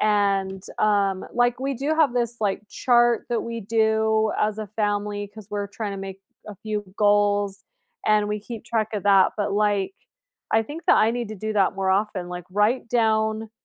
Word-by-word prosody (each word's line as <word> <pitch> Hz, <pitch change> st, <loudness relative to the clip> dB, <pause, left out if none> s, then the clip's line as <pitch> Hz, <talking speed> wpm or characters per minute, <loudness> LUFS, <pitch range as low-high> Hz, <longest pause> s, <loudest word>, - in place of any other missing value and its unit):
And, 195 Hz, -2 st, +1 dB, 0.2 s
um, 200 Hz, -3 st, +1 dB
like, 245 Hz, 0 st, +1 dB
we 275 Hz, +1 st, -1 dB
do 280 Hz, +5 st, -1 dB
have 310 Hz, -6 st, +3 dB
this, 235 Hz, -1 st, -2 dB
like, 205 Hz, -1 st, 0 dB
chart 240 Hz, +1 st, +2 dB
that 235 Hz, -1 st, -1 dB
we 230 Hz, 0 st, -5 dB
do 220 Hz, 0 st, +1 dB
as 210 Hz, 0 st, 0 dB
a 215 Hz, -, -4 dB
family, 205 Hz, 0 st, -2 dB
'cause 210 Hz, 0 st, -13 dB
we're 205 Hz, -1 st, -2 dB
trying 205 Hz, +1 st, -5 dB
to -, -, -5 dB
make 195 Hz, 0 st, -7 dB, 0.3 s
a 210 Hz, -, -8 dB
few 210 Hz, 0 st, -4 dB
goals 205 Hz, -1 st, +2 dB, 0.4 s
and 210 Hz, -1 st, +3 dB
we 210 Hz, -, -2 dB
keep 225 Hz, +1 st, -8 dB
track 220 Hz, -2 st, -1 dB
of 205 Hz, -, -3 dB
that, 195 Hz, -2 st, +5 dB
but, 205 Hz, -1 st, -1 dB
like, 205 Hz, -, +1 dB, 0.6 s
I 220 Hz, 0 st, +3 dB
think 310 Hz, +7 st, -8 dB
that -, -, +5 dB
I 220 Hz, -, +4 dB
need 240 Hz, -2 st, -3 dB
to 215 Hz, -, -6 dB
do 215 Hz, +2 st, -4 dB
that 195 Hz, -2 st, +2 dB
more 195 Hz, 0 st, -1 dB
often, 195 Hz, -2 st, 0 dB
like 180 Hz, -1 st, -6 dB
write 210 Hz, +6 st, +1 dB
down 220 Hz, -1 st, +1 dB
210 Hz, 195 wpm, -24 LUFS, 205-225 Hz, 0.6 s, that